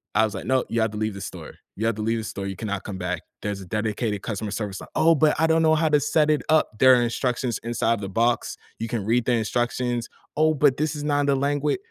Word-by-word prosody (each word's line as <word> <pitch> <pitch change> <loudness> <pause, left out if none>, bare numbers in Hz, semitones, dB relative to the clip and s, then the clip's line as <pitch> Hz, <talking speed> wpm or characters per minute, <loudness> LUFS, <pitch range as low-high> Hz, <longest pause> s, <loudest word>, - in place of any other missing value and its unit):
I 110 +1 +5
was, 110 - -4
like, - - -6
"No, 130 +2 +1
you 115 - 0
have 110 - +2
to 105 - -6
leave 110 0 -1
the 100 - -8
store. - - -8 0.2
You 110 - -2
have 115 - +2
to 110 - -5
leave 115 +1 0
the 110 - -3
store; 100 -2 -5
you 95 - -4
cannot 100 -1 -4
come 100 -3 -6
back. 90 -2 -3 0.2
There's 100 -1 -3
a - - -9
dedicated 105 +1 -2
customer 110 -1 -3
service 105 -2 -4
li" - - -9
"Oh, 165 +1 +5
but 155 -1 +2
I 160 - +4
don't 160 0 +3
know 160 0 +4
how 160 0 +2
to 150 -1 +4
set 150 +1 +2
it 150 - +1
up." 155 -4 +3
"There 130 +1 +7
are 120 - +3
instructions 120 0 -1
inside 115 -1 0
the 95 - -4
box. 115 +4 0 0.2
You 115 - -3
can 110 -3 -3
read 115 +2 +1
the 125 - +2
instructions." 120 +1 -1 0.3
"Oh, 155 0 +3
but 140 -2 +4
this 155 +1 -1
is 145 - -5
not 145 -1 +1
the 140 - +3
langua" 145 +2 0
115 Hz, 270 wpm, -24 LUFS, 105-145 Hz, 0.3 s, There